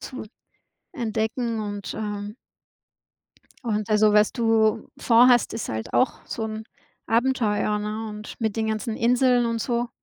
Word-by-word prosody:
zu 260 -3 -7 0.7
entdecken 230 -2 -2
und, 205 -1 -5
äh 210 -1 -5 1.3
und 215 -2 -2
also, 215 0 +4
was 210 0 +4
du 225 -2 +1
vorhast, 240 +1 +5
ist 225 - -4
halt 110 0 -5
auch 255 - +2
so 220 - -4
'n 220 0 -5 0.4
Abenteuer, 225 -4 +1
ne, 215 +1 -4
und 210 0 -8
mit 220 -1 -1
den 220 0 0
ganzen 220 +1 -2
Inseln 245 0 +3
und 230 -1 -2
so. 240 0 -1
220 Hz, 140 wpm, -24 LUFS, 210-235 Hz, 1.3 s, vorhast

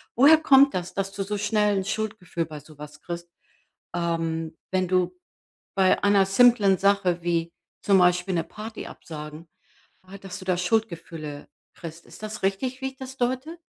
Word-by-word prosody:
woher 290 +6 +8
kommt 275 -2 +6
das, 180 0 -3
dass 195 0 -2
du 195 0 -3
so 205 +1 -3
schnell 210 0 +2
'n 190 - 0
Schuldgefühl 205 -5 -3
bei 150 -2 -9
sowas 150 -1 -12
kriegst? 170 0 -6 0.7
Ähm, 165 -2 -2
wenn 185 -1 +1
du 185 -1 +1 0.6
bei 190 -1 +3
einer 200 -1 +5
simplen 200 -1 +5
Sache, 195 -3 +2
wie 170 -1 -1 0.3
zum 195 -1 +4
Beispiel 180 +1 +3
'ne 165 -2 +1
Party 215 +1 -8
absagen, 155 +1 -9 0.6
ha 190 +2 -10
dass 195 -2 -8
du - - -10
da 185 -1 +2
Schuldgefühle 170 -6 -2 0.3
kriegst. 165 -1 -9
Ist - - -14
das 215 0 -6
richtig, 250 +7 -1
wie 265 - -1
ich 265 - -12
das 265 0 -9
deute? 260 +7 -2
190 Hz, 165 wpm, -25 LUFS, 170-215 Hz, 0.7 s, woher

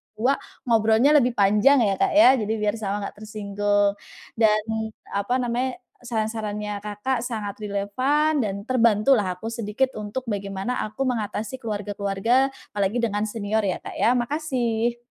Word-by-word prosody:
dua. 250 +6 +1 0.2
Ngobrolnya 225 +3 +4
lebih 245 -2 0
panjang 210 +7 +4
ya 195 -3 0
Kak - - +2
ya, 315 - +8
jadi 215 0 -1
biar 210 0 -1
sama 205 -1 -2
nggak 200 - -7
tersinggung. 205 -1 0 0.5
Dan 215 -1 +4 0.5
apa 200 +5 -1
namanya 245 +2 -1 0.3
saran-sarannya 215 -3 -3
Kakak 210 +5 -2
sangat 215 -4 -5
relevan 255 +10 +1
dan 200 -2 -3
terbantu 235 -1 +3
lah 185 -7 0
aku 225 +4 -5
sedikit 230 +3 -1
untuk 210 +5 -5
bagaimana 200 +1 -3
aku 215 +6 -3
mengatasi 225 0 -3
keluarga-keluarga, 210 +3 0 0.2
apalagi 200 +2 0
dengan 220 -4 0
senior 220 0 -1
ya 195 -3 -1
Kak - - -9
ya, 245 +2 +4
makasih. 240 -4 -1
215 Hz, 145 wpm, -24 LUFS, 205-245 Hz, 0.5 s, ya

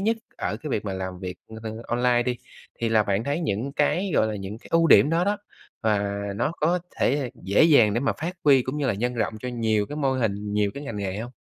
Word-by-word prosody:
nhất 225 +3 +1 0.2
ở 105 +4 -2
cái 150 +4 -7
việc 105 - -1
mà 100 - -3
làm 95 -1 -5
việc, 90 -1 -6 0.3
ơ, 110 - -4 0.2
online 120 0 +2
đi 125 0 -1 0.4
thì 115 - +1
là 110 -1 +4
bạn 100 +1 -1
thấy 145 +5 -1
những 135 - -2
cái, 175 +7 +1
gọi 110 - +4
là, 110 -1 -3
những 100 +2 -6
cái - - -16
ưu 165 0 +4
điểm 150 - +7
đó 170 +2 +2
đó, 205 +2 +1 0.5
và 100 -2 +1 0.2
nó 155 - 0
có 170 +4 +2 0.2
thể 135 -1 +1
dễ 100 - +3
dàng 140 -10 +5
để 120 - +1
mà 140 - +1
phát 170 +3 -2
huy 135 -3 +6
cũng 130 +4 -4
như 145 - 0
là 120 - +1
nhân 120 +5 -1
rộng 115 -1 -1
cho 125 - -4
nhiều 110 -4 0
cái 145 - -7
mô 140 -3 +1
hình, 105 -5 -1
nhiều 105 -1 +2
cái 140 - -6
ngành 115 -6 -5
nghề 100 -1 -3
hông? 120 +3 -5
120 Hz, 255 wpm, -25 LUFS, 105-145 Hz, 0.5 s, điểm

